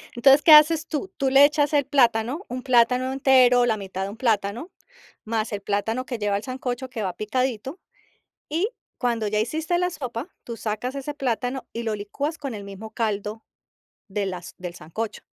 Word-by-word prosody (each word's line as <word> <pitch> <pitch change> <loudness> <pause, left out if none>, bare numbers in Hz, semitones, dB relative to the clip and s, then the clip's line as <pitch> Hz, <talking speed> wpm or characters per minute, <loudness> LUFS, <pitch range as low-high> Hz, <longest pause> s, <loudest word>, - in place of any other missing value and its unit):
Entonces, 270 +4 +6
¿qué 320 - +5
haces 310 +1 +7
tú? 315 +5 -4
Tú 270 -1 +1
le 275 +2 +8
echas 295 0 +1
el 285 -2 +3
plátano, 255 - +2
un 250 0 -5
plátano 255 +1 +3
entero, 255 -2 +5
la 220 -2 +1
mitad 190 -1 -5
de 195 - -3
un 215 - -9
plátano, 225 - -1 0.5
más 220 0 -2
el 200 - -3
plátano 220 +5 -1
que 245 -3 -4
lleva 205 -1 0
el 205 - -6
sancocho, 255 -1 -4
que 225 -4 -4
va 185 -2 -2
picadito, 255 - -2 0.7
y, 340 +8 0 0.3
cuando 235 -3 0
ya 210 +1 0
hiciste 315 +9 -1
la 360 0 +1
sopa, 255 -1 -5 0.2
tú 235 -1 -6
sacas 225 +5 -3
ese 280 +1 -5
plátano 255 -1 -2
y 235 - -4
lo 220 -1 -1
licuas 280 +10 -4
con 275 -5 -5
el 200 -1 -7
mismo 200 +2 -9
caldo 215 -1 -3 0.6
de 200 0 -2
las 180 -2 -6
del 180 -1 -6
sancocho. 205 +8 -5
245 Hz, 190 wpm, -24 LUFS, 215-275 Hz, 0.7 s, le